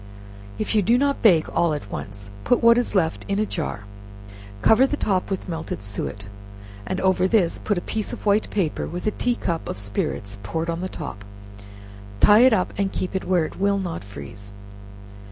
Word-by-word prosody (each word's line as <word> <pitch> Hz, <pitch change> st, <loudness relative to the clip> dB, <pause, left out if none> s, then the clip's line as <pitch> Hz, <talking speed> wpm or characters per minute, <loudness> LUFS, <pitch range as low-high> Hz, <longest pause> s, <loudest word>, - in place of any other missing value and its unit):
If 215 Hz, -, -2 dB
you 215 Hz, -, +4 dB
do 230 Hz, +6 st, +3 dB
not 280 Hz, +1 st, +1 dB
bake 175 Hz, -8 st, +5 dB
all 165 Hz, -3 st, +2 dB
at 100 Hz, -9 st, -8 dB
once, 100 Hz, 0 st, -7 dB
put 245 Hz, -, +2 dB
what 235 Hz, +1 st, +7 dB
is 245 Hz, -, -2 dB
left 165 Hz, -4 st, +1 dB
in 200 Hz, -, 0 dB
a 215 Hz, -, +1 dB
jar, 155 Hz, -, -4 dB, 0.8 s
cover 250 Hz, +5 st, +6 dB
the 295 Hz, -, -2 dB
top 190 Hz, -7 st, 0 dB
with 195 Hz, -1 st, -3 dB
melted 165 Hz, -, -5 dB
suet, 100 Hz, 0 st, -4 dB, 0.6 s
and -, -, -2 dB
over 185 Hz, -1 st, +3 dB
this 190 Hz, -5 st, +2 dB
put 205 Hz, -, -1 dB
a -, -, -1 dB
piece 215 Hz, +3 st, -3 dB
of -, -, -8 dB
white 205 Hz, +1 st, +2 dB
paper, 185 Hz, -7 st, -1 dB
with 175 Hz, +2 st, -6 dB
a 215 Hz, -, +2 dB
tea 245 Hz, +3 st, 0 dB
cup 170 Hz, -7 st, -3 dB
of -, -, -4 dB
spirits 100 Hz, 0 st, -3 dB
poured 160 Hz, +12 st, -2 dB
on 165 Hz, +1 st, -4 dB
the 185 Hz, -, -3 dB
top; 145 Hz, -, -7 dB, 1.0 s
tie 210 Hz, -, +7 dB
it 255 Hz, +2 st, +7 dB
up 185 Hz, -5 st, +1 dB
and 195 Hz, -1 st, +1 dB
keep 185 Hz, +1 st, -4 dB
it 190 Hz, -, -2 dB
where 180 Hz, -3 st, +2 dB
it -, -, -9 dB
will 200 Hz, +1 st, +2 dB
not 180 Hz, -, -4 dB
freeze. 100 Hz, +2 st, -10 dB
185 Hz, 200 wpm, -23 LUFS, 150-210 Hz, 1.0 s, what